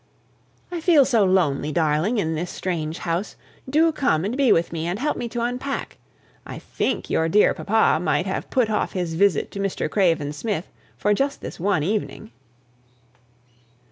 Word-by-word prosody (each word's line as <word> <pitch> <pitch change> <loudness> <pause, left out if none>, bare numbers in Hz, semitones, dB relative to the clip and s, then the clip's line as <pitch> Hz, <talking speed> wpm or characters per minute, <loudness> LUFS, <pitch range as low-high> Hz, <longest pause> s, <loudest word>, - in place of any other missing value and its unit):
"I 345 -2 -4
feel 315 -5 +5
so 235 -6 +3
lonely, 160 -6 +1
darling, 160 +8 +1
in 160 -6 0
this 170 +3 -3
strange 165 -3 -3
house; 175 +4 -3 0.3
do 320 +4 +4
come 195 - 0
and 220 +5 -2
be 270 -3 +3
with 165 +1 +2
me, 165 0 -3
and 175 +3 -2
help 295 +6 -1
me 240 - -4
to 235 +1 -3
unpack. 250 +3 -4 0.5
I - - -8
think - - -3
your 160 0 +1
dear 205 +5 +4
papa 220 +2 +2
might - - +1
have - - -4
put 255 -4 +2
off 210 - -1
his 175 -3 -2
visit 195 +3 +2
to 200 - -7
Mr. 195 -5 -1
Craven 165 -6 +1
Smith 190 +2 -4 0.3
for 210 - +2
just 275 +6 -1
this - - -8
one 190 -4 +1
evening." 195 - -3
195 Hz, 170 wpm, -23 LUFS, 165-240 Hz, 0.5 s, feel